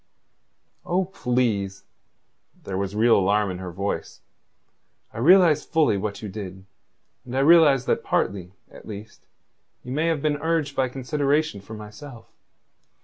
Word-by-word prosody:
"Oh, 185 +2 0
please." 120 - -1 0.8
There 95 - -5
was 100 +1 -3
real 115 +2 +4
alarm 100 +1 +1
in 90 - -6
her 90 -1 -6
voice. 100 +3 -4 0.9
"I - - -7
realize 165 +1 +5
fully 155 -9 +2
what 100 +2 -4
you - - -4
did, 95 -2 -8 0.6
and 125 0 -5
I - - +3
realize 145 -4 +6
that - - 0
partly, 95 -3 -1 0.2
at - - -14
least, 105 0 -10 0.6
you 125 - -8
may 155 +5 0
have 160 -3 -1
been 150 -1 +1
urged 160 -2 -1
by 130 -2 +1
consideration 140 -1 -1
for 110 +3 -10
myself. 115 +4 -11
120 Hz, 145 wpm, -24 LUFS, 100-150 Hz, 0.9 s, realize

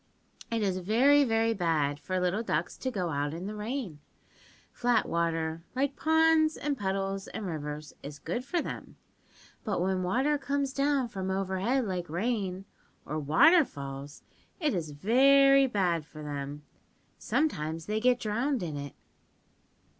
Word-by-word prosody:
"It 230 -2 -1
is 185 -2 0
very, 255 +10 +4
very 225 -2 +2
bad 155 -7 0
for 185 +3 -2
little 180 +4 0
ducks 170 -6 -2
to 260 - -3
go 185 -8 -2
out 145 0 -2
in 175 +3 -6
the 210 - -4
rain. 210 - -4 0.7
Flat 245 0 +1
water, 165 -1 -1
like 275 +1 0
ponds 320 0 +3
and 290 -1 -1
puddles 195 -2 -2
and 220 - -6
rivers, 150 -3 -5
is 145 +1 -8
good 245 - -4
for 335 +5 -1
them, - - -7 0.7
but 200 -5 -1
when 185 +1 0
water 260 +11 +1
comes 275 0 -1
down 275 -2 +1
from 190 -4 -4
overhead 195 +7 0
like 180 -4 -3
rain, 195 0 -2 0.4
or 155 +1 -3
water 160 - +6
falls, 140 - -8 0.4
it 305 -5 +1
is 165 -4 -2
very 275 - +5
bad 180 -8 0
for 155 0 -11
them. 145 0 -5 0.6
Sometimes 160 - -1
they 215 +1 -1
get 250 +1 +3
drowned 235 +3 -1
in 155 -4 -4
it.) 140 -1 -7
195 Hz, 150 wpm, -29 LUFS, 160-260 Hz, 0.7 s, water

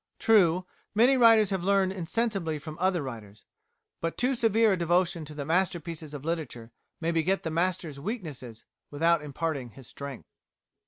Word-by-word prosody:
True, 185 -5 +4 0.3
many 245 +5 +5
writers 225 -4 +6
have 190 -3 -1
learned 195 0 +2
insensibly 190 -2 -2
from 155 +1 -8
other 180 -3 +1
writers, 110 -6 -9 0.5
but 165 0 -3
too 255 +2 +1
severe 225 -3 +3
a - - +2
devotion 175 -1 +1
to 150 0 -9
the 145 -1 -4
masterpieces 165 -2 -1
of 145 0 -8
literature 145 -9 -4 0.3
may 165 0 -1
beget 170 +4 0
the 160 - -3
master's 170 -3 -1
weaknesses 145 - -6 0.2
without 165 +2 +2
imparting 145 -3 -3
his 135 - -12
strength. 140 0 -9
170 Hz, 155 wpm, -28 LUFS, 150-190 Hz, 0.5 s, writers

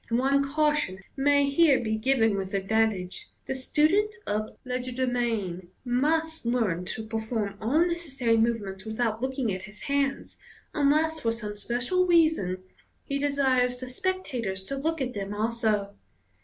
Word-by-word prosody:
One 270 +4 +3
caution 300 -11 +1
may 285 +1 +3
here 280 -1 +5
be 220 -2 -1
given 225 -2 +2
with 195 0 -3
advantage: 195 -2 0 0.2
the - - -2
student 315 - +2
of 215 +1 -2
legerdemain 245 -7 -2 0.2
must 320 +6 +1
iearn 220 -8 0
to 220 - -3
perform 220 -2 -2
all 290 +10 +3
necessary 280 -9 0
movements 220 -4 0
without 220 0 -1
looking 260 -4 -1
at 185 0 -5
his 210 0 -10
hands, 280 -1 -1 0.3
unless 310 +2 +2
for 230 -6 0
some 215 -2 -5
special 245 - 0
reason 315 - +3 0.4
he 280 0 -2
desires 265 -3 +2
the 255 0 -7
spectators 250 - -2
to 275 - -4
look 315 +3 -1
at 255 -1 -2
them 200 0 -4
a'so. 215 -2 0
245 Hz, 140 wpm, -27 LUFS, 215-280 Hz, 0.4 s, here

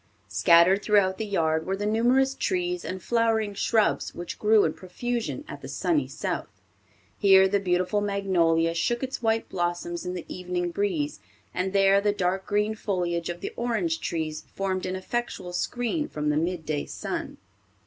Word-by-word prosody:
Scattered 170 - +5
throughout 200 -3 +2
the 220 - -2
yard 160 -4 0
were 190 - 0
the 205 - -3
numerous 245 +5 +3
trees 360 +3 -1
and 185 -1 -5
flowering 225 -3 +1
shrubs 220 +2 +1
which 175 - -6
grow 215 0 +5
in 155 - +1
profusion 240 +8 -4
at - - -8
the - - -8
"sunny 320 -4 0
South." - - -4 0.7
Here 190 -1 +7
the 200 +1 +1
beautiful 185 +2 +1
magnolia 175 -5 +2
shook 240 +9 0
its 265 -1 -4
white 225 -1 +1
blossoms 175 -1 -2
in 180 0 -4
the 175 - -6
evening 180 -1 -3
breeze, 170 -6 -1 0.3
and 185 +1 -1
there 195 0 +4
the 205 0 +2
dark 190 -1 -1
green 210 +1 +1
foliage 175 -6 -2
of 175 0 -5
the - - -5
orange 215 -9 -1
trees 155 -2 -3
formed 190 -1 -1
an 185 - -2
effectual 190 -2 -4
screen 245 - -1
from 150 0 -2
the 150 - +1
mid 165 0 -1
day 150 -1 -2
sun. - - -5
190 Hz, 170 wpm, -26 LUFS, 175-220 Hz, 0.7 s, Here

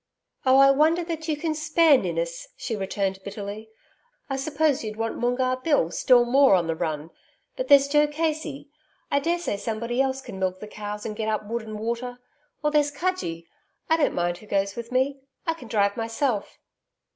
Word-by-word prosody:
'Oh, 260 +1 +6
I 275 0 +8
wonder 315 +5 +3
that 325 -1 -5
you 305 -2 0
can 315 +1 -1
spare 310 0 +4
Ninnis,' - - -2
she 230 - -3
returned 195 -1 -2
bitterly. 205 +2 -7 0.6
'I 270 - 0
suppose 295 0 +1
you'd 215 -1 -5
want 225 0 -2
Moongarr 255 +1 +1
Bill 255 - +1
still 245 +5 +4
more 265 -2 +5
on 175 -2 +1
the 165 - 0
run. 160 -1 -3 0.4
But - - -3
there's 280 -1 +7
Joe 295 +1 +4
Casey 300 -2 -3 0.4
I 280 - +3
daresay 340 -7 -1
somebody 230 +4 -2
else 265 0 0
can 195 -7 -9
milk 185 0 -1
the 210 - -7
cows, 210 0 -6
and 215 - -4
get 220 0 -3
up 215 -1 -1
wood 235 +3 -3
and 215 -1 -7
water. 235 +3 -3 0.5
Or 300 - +2
there's 295 -1 +3
Cudgee 290 - -3 0.5
I 320 - +6
don't 305 - +1
mind 175 0 -1
who 215 - -15
goes 195 0 0
with 235 +1 -7
me.... 265 +2 +1 0.3
I 330 - +1
can 260 -7 -12
drive 200 -2 +1
myself.' 225 -1 -2
250 Hz, 190 wpm, -25 LUFS, 210-295 Hz, 0.6 s, I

